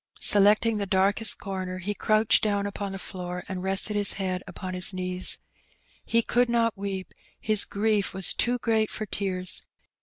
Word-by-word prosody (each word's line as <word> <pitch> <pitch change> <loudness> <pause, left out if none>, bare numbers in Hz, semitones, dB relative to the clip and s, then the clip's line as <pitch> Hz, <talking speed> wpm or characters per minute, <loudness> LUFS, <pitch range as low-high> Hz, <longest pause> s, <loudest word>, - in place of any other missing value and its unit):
Se 205 - +6
lecting 215 +2 +4
the 200 - -3
darkest 195 +4 +2
comer, 185 -2 -5
he 190 +3 -3
crouched 215 +1 +2
down 205 -2 0
upon 200 0 -4
the 195 - -5
floor 180 -1 -6
and 190 -2 -5
rested 195 +3 +1
his 205 -1 +3
head 185 -2 -3
upon 185 -2 -7
his 180 +1 +3
knees. 185 0 0 0.7
He 230 0 +1
could 245 +1 +1
not 230 -1 +1
weep, 195 -1 -6 0.3
his 215 -1 +1
grief 210 -1 0
was 190 -1 +3
too 245 +1 +1
great 220 -2 0
for 215 - -4
tears. 185 -2 -2
200 Hz, 175 wpm, -26 LUFS, 185-215 Hz, 0.7 s, Se